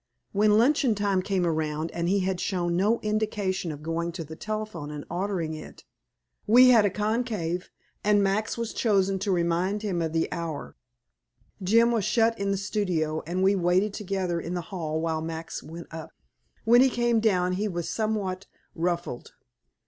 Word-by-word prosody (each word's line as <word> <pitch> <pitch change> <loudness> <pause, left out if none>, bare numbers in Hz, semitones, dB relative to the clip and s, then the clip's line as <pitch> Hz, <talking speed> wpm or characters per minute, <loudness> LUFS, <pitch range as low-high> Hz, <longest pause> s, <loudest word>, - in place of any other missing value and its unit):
When 210 +1 +4
luncheon 255 -1 +3
time 200 -2 +1
came 190 -2 0
around 155 -1 -1
and 170 0 -2
he 200 +1 +2
had 185 -1 -1
shown 175 -2 -1
no 210 +6 +2
indication 210 -4 -1
of 150 0 -9
going 165 +1 -2
to 165 - -5
the 160 +1 -9
telephone 215 -7 -5
and 150 -1 -7
ordering 175 -3 -2
it, 155 - -10 0.6
we 250 +4 +8
had 225 -4 +6
a - - +3
conclave, 210 -5 -2 0.3
and 205 -1 +4
Max 200 +4 0
was 230 -1 -3
chosen 195 -4 +2
to 200 +1 -1
remind 180 +4 0
him 185 -5 -1
of 160 -1 -1
the 165 0 +1
hour. 165 -4 -5 0.9
Jim 230 +5 +4
was 225 -3 +1
shut 230 +2 +2
in 200 0 -1
the 200 - +1
studio, 180 -6 -1
and 180 +2 -1
we 195 +1 +4
waited 185 +3 +2
together 185 -4 -2
in 170 +2 -4
the 175 - -2
hall 160 -3 -2
while 160 -1 -1
Max 160 0 -5
went 165 +2 -9
up. 160 -1 -7 0.6
When 240 +2 +7
he 265 - +5
came 240 -2 +2
down 185 -5 +2
he 200 +4 -1
was 175 -4 -3
somewhat 200 -4 -2 0.3
ruffled. 170 -6 -3
190 Hz, 175 wpm, -27 LUFS, 170-210 Hz, 0.9 s, we